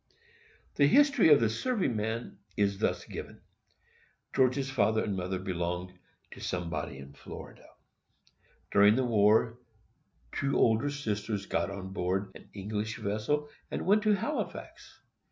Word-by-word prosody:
The 140 Hz, -, +6 dB
history 280 Hz, -, +5 dB
of 145 Hz, -, +8 dB
the 115 Hz, -, +3 dB
serving 195 Hz, -, -1 dB
man 110 Hz, 0 st, -3 dB, 0.2 s
is 100 Hz, -1 st, +1 dB
thus -, -, 0 dB
given: -, -, -8 dB, 0.9 s
George's 130 Hz, +1 st, +2 dB
father 110 Hz, -3 st, +2 dB
and 100 Hz, -, -2 dB
mother 95 Hz, 0 st, -2 dB
belonged 90 Hz, -1 st, -3 dB, 0.4 s
to -, -, -11 dB
somebody 90 Hz, -6 st, -3 dB
in 70 Hz, +1 st, -11 dB
Florida. -, -, -11 dB, 1.0 s
During 105 Hz, +1 st, +6 dB
the 130 Hz, 0 st, +1 dB
war, 110 Hz, +1 st, +3 dB, 0.7 s
two 140 Hz, 0 st, 0 dB
older 115 Hz, +5 st, +3 dB
sisters 105 Hz, -7 st, -3 dB
got 85 Hz, 0 st, -1 dB
on 95 Hz, -1 st, -7 dB
board 95 Hz, +1 st, -1 dB
an -, -, -14 dB
English 105 Hz, +2 st, -3 dB
vessel, 110 Hz, +8 st, -1 dB, 0.2 s
and -, -, -4 dB
went 205 Hz, +3 st, +4 dB
to 215 Hz, 0 st, +3 dB
Halifax. 295 Hz, +10 st, -4 dB
110 Hz, 135 wpm, -30 LUFS, 95-135 Hz, 1.0 s, of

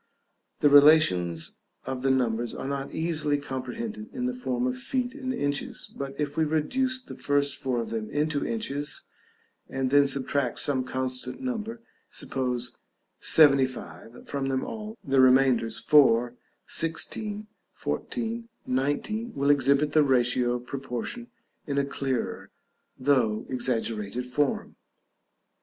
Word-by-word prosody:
The 145 Hz, -, +6 dB
relations 140 Hz, -, +5 dB, 0.3 s
of 130 Hz, -1 st, -4 dB
the 135 Hz, -, +1 dB
numbers 120 Hz, -3 st, 0 dB
are 135 Hz, -, -5 dB
not 140 Hz, 0 st, -3 dB
easily 155 Hz, -3 st, 0 dB
comprehended 215 Hz, -, -5 dB
in 250 Hz, -1 st, -3 dB
the 250 Hz, -, 0 dB
form 125 Hz, -, -2 dB
of 125 Hz, 0 st, 0 dB
feet 250 Hz, -, -1 dB
and 265 Hz, -3 st, -4 dB
inches, 145 Hz, -, -2 dB
but 135 Hz, 0 st, -6 dB
if 145 Hz, -1 st, -2 dB
we 160 Hz, -, +2 dB
reduce 255 Hz, -, 0 dB
the 255 Hz, -, -11 dB
first 145 Hz, -1 st, +1 dB
four 130 Hz, -2 st, -2 dB
of 115 Hz, -, -4 dB
them 110 Hz, -2 st, -3 dB
into 150 Hz, 0 st, 0 dB
inches, 145 Hz, -11 st, -2 dB, 0.7 s
and 135 Hz, -1 st, -1 dB
then 145 Hz, 0 st, +6 dB
subtract 135 Hz, -2 st, -1 dB
some 130 Hz, -3 st, 0 dB
constant 130 Hz, -1 st, -3 dB
number, 230 Hz, -3 st, -4 dB, 0.3 s
suppose 125 Hz, -2 st, -1 dB, 0.4 s
75, 130 Hz, -5 st, +2 dB
from 140 Hz, -1 st, -2 dB
them 130 Hz, -1 st, 0 dB
all, 220 Hz, 0 st, -7 dB
the 135 Hz, -1 st, +2 dB
remainders 130 Hz, -3 st, +4 dB
4, 125 Hz, -5 st, +4 dB, 0.3 s
16, 205 Hz, +6 st, -1 dB, 0.3 s
14, 230 Hz, -1 st, -4 dB, 0.2 s
19, 145 Hz, -, -1 dB
will 140 Hz, +1 st, +3 dB
exhibit 140 Hz, +1 st, +3 dB
the 155 Hz, -, +5 dB
ratio 125 Hz, -3 st, +2 dB
of 125 Hz, 0 st, -4 dB
proportion 135 Hz, -, -5 dB, 0.4 s
in 140 Hz, -1 st, -2 dB
a 140 Hz, -, +2 dB
clearer, 135 Hz, -3 st, -3 dB, 0.5 s
though 125 Hz, -6 st, +2 dB
exaggerated 120 Hz, -2 st, -1 dB
form. 140 Hz, +3 st, -1 dB
140 Hz, 130 wpm, -27 LUFS, 125-160 Hz, 0.7 s, The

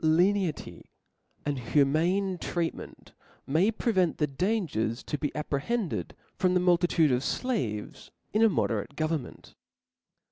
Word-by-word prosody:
T 160 Hz, -, +1 dB
ENITY 180 Hz, +1 st, +1 dB, 0.6 s
and 145 Hz, -2 st, -1 dB
humane 165 Hz, +9 st, +1 dB
treatment 170 Hz, 0 st, -4 dB, 0.3 s
may 165 Hz, +9 st, +3 dB
pre 230 Hz, +1 st, 0 dB
^^ -, -, -10 dB
vent 180 Hz, -4 st, +2 dB
the 150 Hz, -, +2 dB
dangers 140 Hz, -, -1 dB
to -, -, -3 dB
be 145 Hz, 0 st, -1 dB
apprehended 160 Hz, +8 st, -2 dB, 0.2 s
from 185 Hz, -1 st, +2 dB
the -, -, +5 dB
multitude 175 Hz, -3 st, +3 dB
of 125 Hz, 0 st, +2 dB
flaves 125 Hz, -, -3 dB, 0.2 s
in 215 Hz, -, +2 dB
a 225 Hz, -, +6 dB
moderate 120 Hz, -, -1 dB
government. 155 Hz, -4 st, -3 dB
165 Hz, 135 wpm, -28 LUFS, 140-190 Hz, 0.6 s, a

